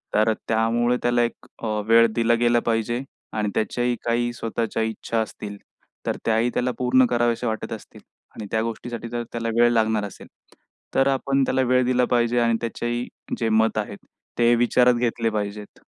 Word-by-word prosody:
तर 110 +1 +4
त्यामुळे 115 +2 +2
त्याला 120 0 +3
एक 120 +1 -4 0.4
वेळ 115 +1 +6
दिला 115 0 +3
गेला 120 0 +3
पाहिजे. 115 +2 0 0.3
आणि 105 -1 -1
त्याच्याही 120 +2 0
काही 120 0 +1
स्वतःच्या 115 -1 -2
इच्छा 110 +1 -2
असतील, 105 -2 -6 0.5
तर - - -1
त्याही 115 +2 +2
त्याला 125 +1 0
पूर्ण 125 +1 +4
कराव्याशा 120 0 0
वाटत 110 -1 -3
असतील. - - -11 0.3
आणि 105 - -7
त्या 110 - +1
गोष्टीसाठी 115 +1 -5
जर 120 0 -3
त्याला 115 -1 -2
वेळ 120 0 +6
लागणार 110 -2 +1
असेल, 100 - -10 0.7
तर 135 - +4
आपण 135 0 +1
त्याला 130 0 +1
वेळ 125 0 +4
दिला 125 0 +2
पाहिजे 120 0 +2
आणि 115 -1 +2
त्याचेही 120 +1 -2 0.3
जे 115 - +1
मत 110 0 +2
आहेत 100 -1 -6 0.3
ते 120 0 +5
विचारात 125 +1 +4
घेतले 120 -1 0
पाहिजेत. 105 -1 -5
120 Hz, 165 wpm, -23 LUFS, 110-120 Hz, 0.7 s, वेळ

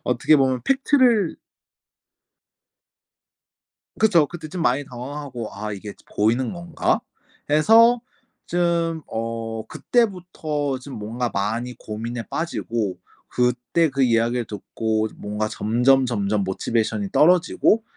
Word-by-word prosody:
어떻게 125 +5 +3
보면 130 -2 +1
팩트를 260 - +3 2.6
그쵸. 175 -9 +4
그때 165 0 -8
좀 170 +2 -5
많이 135 +2 +2
당황하고 125 -2 -6
'아 105 +1 -5
이게 100 +1 -7
저 - - -24
보이는 115 +5 +2
건가?' 170 -1 -1 0.5
해서 225 +10 +6 0.4
좀 170 -2 0
어 115 0 -4
그때부터 175 - -1
좀 135 +1 -10
뭔가 115 +4 -3
많이 115 +5 -2
고민에 115 +2 -5
빠지고 115 - -2 0.3
그때 125 +6 +1
그 135 0 +1
이야기를 120 0 +2
듣고 110 +1 -2
뭔가 105 +1 -3
점점 125 +5 +2
점점 105 -3 0
motivation이 105 +1 -1
떨어지고 180 +6 +4
125 Hz, 255 characters per minute, -23 LUFS, 110-165 Hz, 2.6 s, 해서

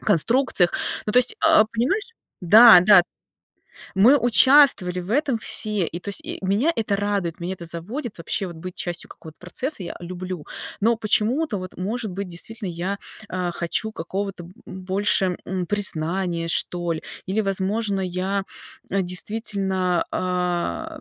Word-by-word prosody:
конструкциях. 205 - +2 0.3
Ну, 210 - -3
то 250 - +5
есть, 250 - +5
а, 215 - +6
понимаешь, 270 - -1 0.3
да, 215 +3 +9
да, 185 -1 +7 0.9
мы 235 +9 +6
участвовали 245 -6 +5
в 180 +4 -7
этом 275 -3 +1
все, 215 -2 +2
и 170 - -6
то - - -15
есть 200 - -1
и - - -6
меня 205 - +1
это 215 -6 -1
радует, 200 -4 -2
меня 175 - -4
это 170 - -10
заводит 205 - -6
вообще- 180 +3 -3
вот 170 - -9
быть 180 +2 -8
частью 175 -1 -5
какого-то 160 -1 -13
процесса 205 - -4
я, 170 - -5
э, 175 - -9
люблю. 180 -2 -7 0.3
Но 230 +3 +2
почему-то, 225 +4 0
вот 185 -1 -8
может 215 +2 -4
быть, 195 +1 -5
действительно, 205 +4 -5
я, 180 +4 -4 0.3
а, 180 -1 -3
хочу 175 +6 -2
какого-то, 195 0 -5
м, 175 - -14
б 185 - -10
больше, 190 -1 +1
м, 185 -1 -3
признания, 175 -2 -1
что 175 0 -2
ли. 160 - -7 0.2
Или, 200 +4 -1
возможно, 195 +1 -1
я, 185 +2 -2 0.5
а, 195 - 0
действительно, 190 -1 -1
а, 180 - -2
190 Hz, 155 wpm, -22 LUFS, 180-220 Hz, 0.9 s, да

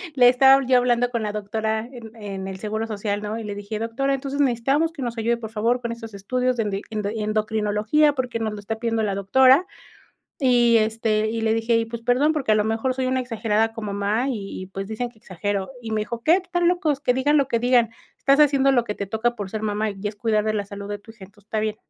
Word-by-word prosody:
le 250 -2 +6
estaba 270 +2 +6
yo 255 0 +4
hablando 245 0 +2
con 235 -2 -2
la 210 - -2
doctora 220 +1 -2
en, 235 -3 -11
en 195 -3 -6
el 190 -1 -7
seguro 220 +2 -3
social, 205 -1 -3
¿no? 210 +2 -4
Y - - -6
le 205 -1 -5
dije: 205 +1 -5
"Doctora, 240 +5 -1
entonces 275 +1 -2
necesitamos 275 +5 +1
que 300 - -8
nos 240 -2 -3
ayude, 235 +1 +1
por 225 -2 -7
favor, 230 +3 0
con 235 - -3
esos 225 -2 -10
estudios 250 +6 -1
de 225 - +1
endi 200 -2 -3
endo 210 -2 -2
endocrinología, 215 +6 +1
porque 250 -4 -3
nos 220 -1 -2
lo 210 - -7
está 220 +2 -4
pidiendo 230 -1 0
la 200 -2 -1
doctora", 260 - +5 0.7
y 240 -4 +4
este, 220 0 0
y 225 0 -2
le 220 0 +2
dije: 225 +1 +1
"Y, 230 - -1
pues 230 0 -7
perdón 250 +6 +3
porque 280 -8 0
a - - +5
lo 210 - +2
mejor 225 +4 -1
soy 260 0 -1
una 260 0 +1
exagerada 225 -2 0
como 220 -3 -5
mamá 210 +6 0
y 200 -7 -5
y - - -7
pues 195 +1 -6
dicen 220 +3 -3
que 235 - -25
exagero". 200 0 -3
Y 225 - -6
me 215 -1 0
dijo: 235 +1 -6
"¿Qué? 320 - +5
Están 355 -2 0
locos, 320 -6 +1
que 250 -4 +1
digan 290 +4 +3
lo 275 -2 +1
que 235 - +1
digan, 240 -1 +3 0.3
estás 275 +1 +3
haciendo 275 -2 +4
lo 240 -3 +3
que 210 - -4
te 200 - -5
toca 220 +4 -1
por 200 -3 -5
ser 220 +1 -4
mamá 215 0 -1
y 195 -1 -10
es 205 - -3
cuidar 215 -1 +1
de 215 0 0
la 205 -1 -2
salud 200 0 -8
de 205 - -3
tu 205 - -16
hija, 220 -4 -13
entonces 200 +1 -21
está 215 0 -2
bien". 215 0 -2
225 Hz, 255 wpm, -23 LUFS, 210-250 Hz, 0.7 s, le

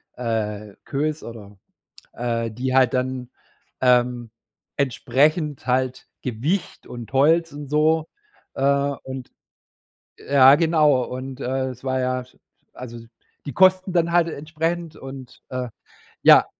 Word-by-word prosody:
äh, 105 -4 -3
Queues 150 +2 -2
oder 105 -4 -10 0.6
äh, 115 -1 -2
die 130 +3 -2
halt 130 -2 +4
dann, 130 -1 -2 0.5
ähm, 125 -2 +2 0.5
entsprechend 145 +1 +1
halt 130 0 0 0.2
Gewicht 135 - -2
und 120 +1 -9
Holz 160 +5 +3
und 145 -1 -8
so. 155 +2 +2 0.5
Äh, 135 - -4 0.4
und 130 -1 -7 0.9
ja 135 -1 +6
genau, 155 -6 +3
und, 130 +2 -7
äh, 130 0 -1
es 125 0 -11
war 130 0 0
ja 130 0 -1 0.5
also 120 -2 -8 0.5
die 140 - -4
Kosten 185 +1 +4
dann 170 -1 +1
halt 175 -1 +4
entsprechend 160 +2 -3
und, 135 -2 -10
äh 125 -1 -3 0.6
ja, - - +8
130 Hz, 120 wpm, -23 LUFS, 125-155 Hz, 0.9 s, ja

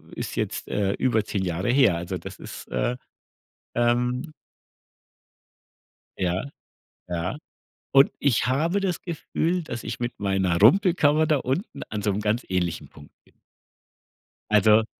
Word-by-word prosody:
ist - - -5
jetzt, - - -3
äh, 100 -1 0
über 115 -4 +1
10 100 -2 -2
Jahre 90 +4 -1
her. 125 -10 +5
Also, 85 +1 -4
das - - -9
ist, - - -9
äh, 125 +1 0 0.8
ähm 125 +5 +1 1.9
Ja, 90 0 0 0.7
ja. 90 +7 -2 0.6
Und 135 0 +6
ich 125 -6 +2
habe 160 +10 +1
das 185 -3 -1
Gefühl, 170 +1 -2
dass 120 -7 -6
ich 115 - -5
mit 120 0 -3
meiner 95 -3 +1
Rumpelkammer 155 - +5
da 155 - +3
unten 135 - -3
an 105 -1 -4
so 105 - +1
'nem 100 +2 -1
ganz 110 +3 0
ähnlichen 90 -3 -2
Punkt 70 - -16
bin. - - -28 1.1
Also 110 +1 +5
120 Hz, 135 wpm, -25 LUFS, 95-145 Hz, 1.9 s, Und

